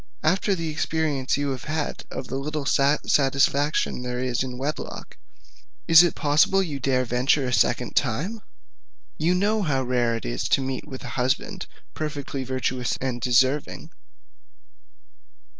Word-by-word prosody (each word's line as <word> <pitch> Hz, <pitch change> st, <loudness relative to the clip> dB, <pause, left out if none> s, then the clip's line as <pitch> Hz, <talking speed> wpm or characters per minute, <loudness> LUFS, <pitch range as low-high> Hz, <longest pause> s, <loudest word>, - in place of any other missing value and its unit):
After 190 Hz, +4 st, +2 dB
the 165 Hz, -2 st, -3 dB
experience 155 Hz, -4 st, -1 dB
you 145 Hz, 0 st, -1 dB
have 130 Hz, -3 st, -5 dB
had 155 Hz, -1 st, -3 dB
of 130 Hz, -, -6 dB
the -, -, -5 dB
little 150 Hz, +1 st, -3 dB
satisfaction 140 Hz, 0 st, +2 dB
there 125 Hz, 0 st, -4 dB
is 125 Hz, -1 st, -1 dB
in 125 Hz, -1 st, -4 dB
wedlock, 145 Hz, +4 st, -5 dB, 0.7 s
is 165 Hz, 0 st, +9 dB
it 175 Hz, -, +2 dB
possible 155 Hz, +6 st, +3 dB
you 150 Hz, -6 st, -4 dB
dare 130 Hz, -1 st, +1 dB
venture 125 Hz, +3 st, +2 dB
a 125 Hz, -, -2 dB
second 120 Hz, 0 st, +1 dB
time? 155 Hz, -, -1 dB, 0.8 s
You 170 Hz, +3 st, +2 dB
know 210 Hz, +4 st, +1 dB
how 140 Hz, -7 st, 0 dB
rare 120 Hz, -2 st, +1 dB
it 115 Hz, -, -6 dB
is -, -, -3 dB
to -, -, +3 dB
meet 130 Hz, +2 st, -4 dB
with 130 Hz, -3 st, -8 dB
a -, -, -6 dB
husband 145 Hz, +10 st, -1 dB, 0.3 s
perfectly 145 Hz, -3 st, -4 dB
virtuous 130 Hz, -1 st, -2 dB
and 125 Hz, -2 st, -3 dB
deserving. 130 Hz, +4 st, +1 dB
135 Hz, 145 wpm, -24 LUFS, 130-155 Hz, 0.8 s, is